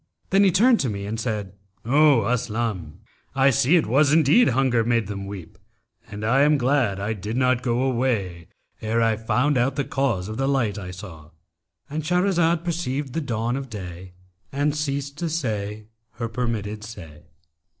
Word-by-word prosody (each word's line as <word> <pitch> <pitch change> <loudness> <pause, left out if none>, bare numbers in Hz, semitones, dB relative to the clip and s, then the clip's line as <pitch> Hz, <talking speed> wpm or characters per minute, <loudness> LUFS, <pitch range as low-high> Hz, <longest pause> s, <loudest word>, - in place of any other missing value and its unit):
Then 195 +1 +5
he 195 - +5
turned 230 +6 +4
to 130 - 0
me 100 -1 -4
and 110 +2 -4
said, 105 -4 -3 0.3
'O 140 -1 +4
Aslam, 110 -8 -2 0.3
I 135 0 +4
see 135 +5 +3
it 165 - +3
was 140 +5 +3
indeed 160 - +5
hunger 125 -2 +2
made 115 -1 +1
them 100 -1 -6
weep; 100 -4 -9 0.5
and 105 +1 -6
I 130 +5 +3
am 150 +1 +4
glad 125 -6 +1
I 105 +3 -2
did 105 +3 -5
not 130 -1 +2
go 120 0 0
away 115 -10 -1 0.3
ere 110 +1 0
I 115 -1 +2
found 125 +5 +1
out 135 +3 +1
the 140 - 0
cause 115 -10 -1
of 110 +1 -6
the 135 +1 0
light 115 -7 0
I 90 -2 -7
saw.'—And 85 - -10
Shahrazad 175 0 +1
per 175 - -1
ceived 140 -5 -3
the 165 - -1
dawn 120 -3 -2
of 135 -1 -5
day 90 -3 -8 0.4
and 145 +2 0
ceased 140 -1 -3
to 170 - -2
say 110 -9 -3 0.3
her 115 +1 -4
permitted 110 -3 -3
say. 80 -10 -11
120 Hz, 175 wpm, -23 LUFS, 105-140 Hz, 0.5 s, Then